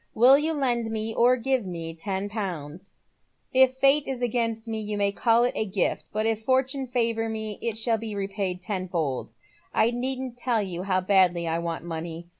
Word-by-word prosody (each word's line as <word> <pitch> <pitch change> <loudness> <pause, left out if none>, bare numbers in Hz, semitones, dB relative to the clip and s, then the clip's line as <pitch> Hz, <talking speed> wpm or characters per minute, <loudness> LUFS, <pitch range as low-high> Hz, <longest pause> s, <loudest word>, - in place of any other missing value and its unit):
Will 250 +5 +7
you 310 +3 +1
lend 240 -6 0
me, 220 0 -3
or 250 +2 +4
give 260 0 0
me, 165 -3 -5
ten 190 +4 -3
pounds? 185 -5 -6 0.6
H 260 0 +6
Fate 275 +2 +4
is 265 -2 -3
against 230 -2 -1
me 220 -1 -3
you 210 -1 -3
may 200 0 +2
call 230 +3 +3
it 245 - +1
a - - 0
gift, 195 -2 -1
but 215 +1 -1
if 225 -1 0
Fortune 265 +2 +1
favour 230 -2 0
mo 220 -1 -4
it 230 -2 -2
shall 225 0 +1
be 220 -1 -5
repaid 195 -2 -3
tenfold. 175 - -2 0.4
I 225 - +4
needn't 255 0 -3
tell 240 -2 +1
you 180 -3 -4
how 185 -1 +1
badly 185 -3 +3
I 165 +1 0
want 170 -1 -4
money. 165 0 -5
220 Hz, 190 wpm, -26 LUFS, 185-245 Hz, 0.6 s, Will